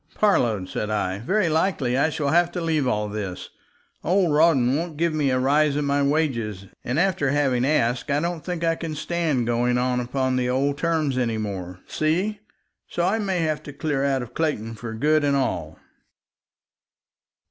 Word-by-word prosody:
"Parload," 115 - +2
said 105 - -3
I, 100 -3 -1
"very 185 - +1
likely 155 -6 +1
I 140 +4 +3
shall 150 -3 -1
have 175 +2 +3
to 180 - -2
leave 160 -5 0
all 105 -3 0
this. 100 -3 -5 0.5
Old 180 -2 +2
Rawdon 145 -5 +4
won't 160 0 -3
give 170 0 +1
me 150 -3 +1
a 130 - +2
rise 145 +3 +2
in 145 0 0
my 140 0 +1
wages, 125 -10 0 0.2
and 125 +5 -1
after 175 -6 +1
having 135 -3 +1
asked 130 -2 +1
I 140 +1 +2
don't 170 0 -3
think 175 -2 -4
I 165 0 +3
can 165 -1 -5
stand 155 -5 -1
going 120 +1 +1
on 125 0 +1
upon 130 +1 -1
the 125 -1 0
old 140 +3 0
terms 155 -5 0
anymore. 100 -7 -3
See? 185 +7 -1 0.5
So 175 - -1
I 205 +5 +1
may 190 -4 -1
have 155 -2 -1
to 145 -2 -9
clear 145 -2 -1
out 135 -2 +1
of 120 0 -11
Clayton 130 -9 -1
for 115 0 -7
good 150 +6 +2
and 140 -1 +2
all." 90 - -2
140 Hz, 180 wpm, -24 LUFS, 125-160 Hz, 0.5 s, Rawdon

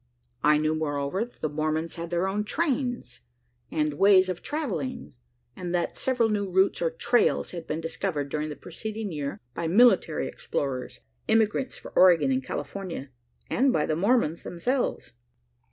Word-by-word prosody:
I 150 +1 +5
knew, 155 +1 +1
moreover, 150 +4 -1
that 240 - -13
the - - +1
Mormons 155 +2 -1
had 170 0 -6
their 175 +2 0
own 205 +2 -1
"trains," 245 - -2 0.5
and 150 -1 0
ways 190 -2 +6
of 180 - -3
travelling; 165 - -4 0.4
and 180 0 -3
that 175 - -1
several 250 -3 +1
new 205 -2 -1
routes 190 +2 +2
or 165 - +2
"trails" 235 +9 +1
had 170 -2 -7
been 155 +2 -2
discovered 165 -3 -3
during 150 +1 -2
the 150 - -5
preceding 215 +5 -6
year, 145 -3 -4
by 170 - -3
military 195 -4 +4
explorers, 130 -3 -4 0.3
emigrants 225 +3 +2
for - - -11
Oregon 170 -7 +5
and 130 0 0
California, 145 -1 -5 0.4
and 265 +2 +2
by 150 - +1
the 155 - 0
Mormons 185 -3 +2
themselves. 245 +10 -2
170 Hz, 155 wpm, -27 LUFS, 150-210 Hz, 0.5 s, ways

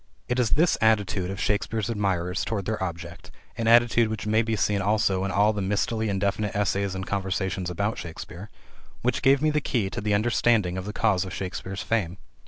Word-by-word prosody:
It 125 +1 0
is 120 -3 +2
this 165 +2 +3
attitude 105 -4 +2
of 95 0 -5
Shakespeare's 105 +1 -1
admirers 95 -5 -1
toward 105 -4 -3
their 110 -1 -2
object 85 -1 -6 0.3
an 115 - -2
attitude 120 0 +5
which 110 -1 -4
may 110 +1 +3
be 115 -1 -1
seen 100 0 +1
also 100 -2 +1
in - - -2
all 105 +3 +3
the 105 - -3
mistily 105 +3 0
indefinite 100 +1 -1
essays 100 -1 0
and 95 0 -4
conversations 95 -2 -2
about 100 +5 -2
Shakespeare 85 +4 -8 0.5
which 125 0 0
gave 135 +1 +4
me 155 - +3
the 150 0 0
key 110 -8 -1
to - - -4
the 105 0 +1
understanding 110 -3 +2
of 95 0 -4
the 105 - -4
cause 100 -6 +2
of 95 - -6
Shakespeare's 95 0 -5
fame. 95 -4 -1
100 Hz, 195 wpm, -26 LUFS, 95-110 Hz, 0.5 s, attitude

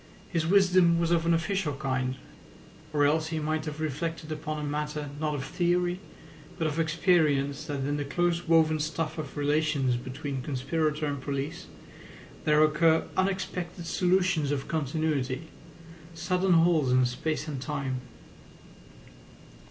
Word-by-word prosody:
His 165 -3 0
wisdom 185 -3 +5
was 170 0 +1
of 170 -1 +2
an 170 - +4
official 175 -2 -1
kind, 130 -2 -1 0.8
or 145 -1 +3
else 155 +2 +2
he 160 0 -3
might 155 0 -1
have 150 0 -5
reflected 155 +1 -3
upon 155 0 -4
a 150 -1 -3
matter 150 0 -3
not 155 -1 -1
of 135 - -4
theory 175 0 0 0.6
but 165 - -1
of 155 +1 -1
experience 155 -4 +2
that 145 -3 -3
in 145 +2 -1
the 145 - -1
close 175 +4 0
woven 160 -1 +4
stuff 155 +1 -2
of 150 -2 -6
relations 145 -3 +1
between 135 +2 -5
conspirator 150 +3 -1
and 145 -2 -3
police 140 +1 -4 0.8
there 150 0 +5
occur 160 +1 +3
unexpected 185 -2 -2
solutions 180 -3 +2
of 140 -1 -2
continuity, 155 -1 -1 0.7
sudden 180 +2 +1
holes 165 -5 +4
in 130 0 +4
space 155 +5 -2
and 140 -4 -4
time. 135 -3 -3
155 Hz, 140 wpm, -28 LUFS, 145-170 Hz, 0.8 s, wisdom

